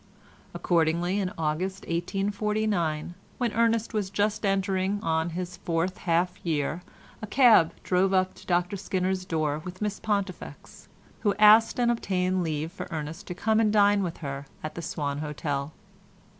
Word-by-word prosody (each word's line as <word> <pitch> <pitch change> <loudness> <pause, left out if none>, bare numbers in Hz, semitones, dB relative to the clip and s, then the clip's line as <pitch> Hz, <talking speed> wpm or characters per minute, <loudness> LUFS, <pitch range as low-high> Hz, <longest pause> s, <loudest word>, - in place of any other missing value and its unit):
Accordingly 170 +3 +1
in 185 -2 -1
August 165 +5 -2
1849, 195 -2 -1 0.2
when 240 -4 -1
Ernest 230 0 +1
was 210 -3 -1
just 210 +2 0
entering 195 0 0
on 160 0 0
his 180 -1 -5
fourth 170 +1 -2
half 175 +2 +1
year 160 0 -1 0.4
a 215 - -5
cab 220 -9 +6
drove 185 +1 +2
up 185 -1 +2
to - - -16
Dr 180 +2 +1
Skinner's 185 -1 -1
door 155 -4 -1
with 180 0 -8
Miss 210 -1 -2
Pontifex, 200 -3 -4 0.3
who 205 -2 +1
asked 215 +3 +6
and 240 -1 +3
obtained 185 -5 0
leave 160 -1 -2
for 195 - -7
Ernest 160 +1 -6
to 180 - -5
come 220 +4 +1
and 215 -2 +3
dine 205 -1 +4
with 175 -3 -3
her 140 0 -5 0.2
at 155 - -4
the 170 - -6
Swan 145 -3 -3
Hotel. 145 -1 -3
185 Hz, 155 wpm, -27 LUFS, 165-205 Hz, 0.4 s, cab